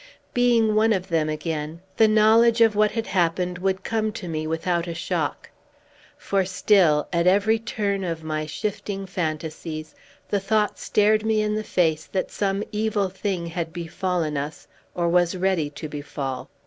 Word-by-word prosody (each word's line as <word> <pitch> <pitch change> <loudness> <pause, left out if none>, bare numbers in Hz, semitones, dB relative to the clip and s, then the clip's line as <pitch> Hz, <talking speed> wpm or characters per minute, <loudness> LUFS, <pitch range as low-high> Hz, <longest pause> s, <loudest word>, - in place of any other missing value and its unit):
Being 235 -3 +3
one 220 +1 +4
of 190 -1 -3
them 160 -2 +1
again, 155 +1 -4 0.2
the 220 - +6
knowledge 220 +2 +5
of 225 -2 +5
what 210 0 +4
had 225 0 -3
happened 180 0 0
would 190 0 -1
come 220 -1 -1
to 195 -4 -6
me 155 -1 -3
without 170 +2 -1
a 170 - -4
shock. 170 - -3 0.7
For 195 -1 0
still, 180 -5 +3
at 170 +1 +2
every 205 +4 +4
turn 205 -3 -2
of 165 -3 -3
my 155 -1 -3
shifting 195 +3 -4
fantasies, 155 -2 -4 0.3
the 205 - 0
thought 210 +1 0
stared 215 +1 +2
me 220 -1 +2
in 210 0 0
the 215 0 -2
face 160 -6 0
that 190 - -2
some 195 0 -1
evil 210 -2 0
thing 190 -2 -3
had 170 -1 -4
befallen 170 -2 -2
us, 145 +2 -5 0.3
or 175 -1 0
was 175 +1 +2
ready 180 -5 +1
to 145 +2 -7
befall. 145 -3 -5
185 Hz, 165 wpm, -24 LUFS, 160-210 Hz, 0.7 s, the